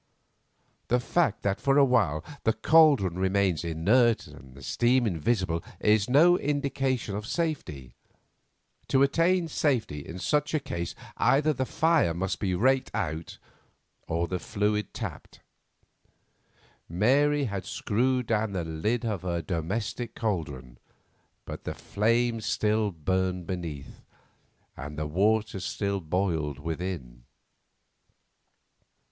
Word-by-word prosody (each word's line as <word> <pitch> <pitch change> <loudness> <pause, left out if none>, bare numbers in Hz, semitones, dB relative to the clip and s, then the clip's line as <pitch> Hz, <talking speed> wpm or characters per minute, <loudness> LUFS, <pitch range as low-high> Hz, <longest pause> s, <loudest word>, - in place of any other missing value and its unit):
The 125 - +2
fact 130 - 0
that 100 -1 -1
for 135 0 +3
a 140 - +7
while 100 - +2 0.2
the 110 - +3
caldron 140 - +4
remains 95 -3 +1
inert 105 +9 +2
and 65 -1 -14
the 70 - -13
steam 120 - +2
invisible 90 -2 0 0.2
is 105 0 +3
no 170 +7 +5
indication 135 -6 -1
of 105 +1 -5
safety. 120 - -3 0.9
To 135 0 +3
attain 170 +5 +2
safety 125 - 0
in 80 +5 -8
such 150 - 0
a - - +2
case 130 -12 -5 0.2
either 150 +3 +3
the 130 -1 -2
fire 160 - +2
must 95 +2 -2
be 95 -3 0
raked 130 +7 +2
out 80 -2 -3 0.7
or 85 +1 -1
the 90 0 -3
fluid 105 +1 -1
tapped. - - -7 1.5
Mary 140 - +3
had 100 -7 -3
screwed 125 +3 0
down 110 -2 0
the 90 -3 -2
lid 105 +10 -1
of 105 -6 -2
her 85 -2 -2
domestic 105 +7 -3
caldron, 70 - -4 0.7
but - - -7
the - - -5
flame 115 +2 0
still 105 0 +1
burned 90 +1 -1
beneath, 85 -6 -6 0.7
and 75 +3 -8
the 75 - -2
water 105 +6 +1
still 100 +1 -2
boiled 80 -4 -1
within. 80 -6 -5
105 Hz, 120 wpm, -27 LUFS, 85-125 Hz, 1.5 s, a